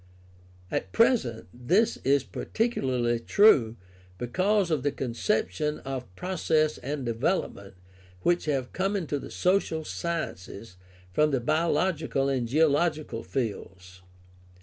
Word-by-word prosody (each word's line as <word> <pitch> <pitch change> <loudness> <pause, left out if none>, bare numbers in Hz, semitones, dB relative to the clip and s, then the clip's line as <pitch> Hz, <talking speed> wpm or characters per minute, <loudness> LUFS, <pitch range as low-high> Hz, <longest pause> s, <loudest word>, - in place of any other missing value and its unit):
At - - -2
present 225 - +2
this 170 - +1
is 140 0 +2
particularly 130 - -1
true 125 - +4 0.4
because 185 - +1
of 155 -4 +1
the 145 +2 0
conception 150 - -1
of 130 -8 -6
process 160 - 0
and 140 -1 -4
development 115 - -2 0.5
which 175 - +1
have 135 -4 -2
come 195 +2 0
into 155 -7 -2
the - - -9
social 180 -4 0
sciences 115 - -5 0.4
from 150 +9 +3
the 135 -3 +1
biological 155 0 0
and 130 -3 -1
geological 155 -1 +1
fields. 95 -8 -5
145 Hz, 110 wpm, -27 LUFS, 120-170 Hz, 0.5 s, true